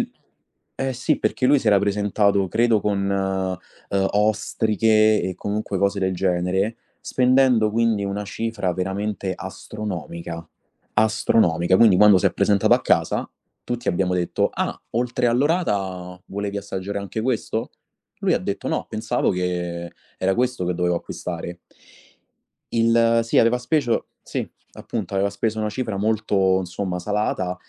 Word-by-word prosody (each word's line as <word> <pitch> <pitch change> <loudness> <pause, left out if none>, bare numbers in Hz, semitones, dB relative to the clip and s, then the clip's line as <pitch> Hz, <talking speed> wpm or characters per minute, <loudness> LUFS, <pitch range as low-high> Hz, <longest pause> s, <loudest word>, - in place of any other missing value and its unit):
l - - -3 0.7
eh 135 0 -1
sì, 130 +5 0
perché 130 - 0
lui 145 +2 +5
si 125 - -7
era 100 -1 +6
presentato 100 0 +1
credo 115 +1 +2
con, 100 -1 0
uhm, 95 0 -2
ostriche 110 +1 +2
e 95 - -2
comunque 105 -1 -3
cose 100 +1 +1
del 95 0 +1
genere, 95 +4 0 0.2
spendendo 125 -3 +3
quindi 110 -2 +1
una 100 +1 -3
cifra 105 -2 -2
veramente 95 +1 -2
astronomica, 85 -4 -6 0.5
astronomica. 105 -5 +3
Quindi 110 -5 +6
quando 105 0 +7
si - - +2
è - - +1
presentato 100 0 +3
a - - +1
casa - - +1 0.4
tutti 120 -1 -4
abbiamo 90 +1 +1
detto: 90 -1 0
"Ah, - - -2
oltre 120 +1 0
all'orata 100 - 0
volevi 100 +1 -4
assaggiare 100 0 -4
anche 100 +2 -4
questo?" 115 -1 -2 0.5
Lui - - +2
ha - - +1
detto: - - -4
"No, - - -2
pensavo - - 0
che 85 -1 -3 0.3
era 95 +1 +1
questo 125 -4 0
che 90 0 -1
dovevo 90 0 +1
acquistare." 85 0 -6 1.2
Il 115 0 +4
sì, 115 - 0
aveva 115 +2 +4
speso 125 -2 0
sì, - - -4 0.3
appunto, 105 -5 -5
aveva 100 +1 +1
speso 110 +2 -2
una 105 0 -1
cifra 110 -1 -3
molto, 100 -3 +2
insomma, 90 0 -3
salata 95 -2 -1
100 Hz, 140 wpm, -22 LUFS, 95-110 Hz, 1.2 s, quando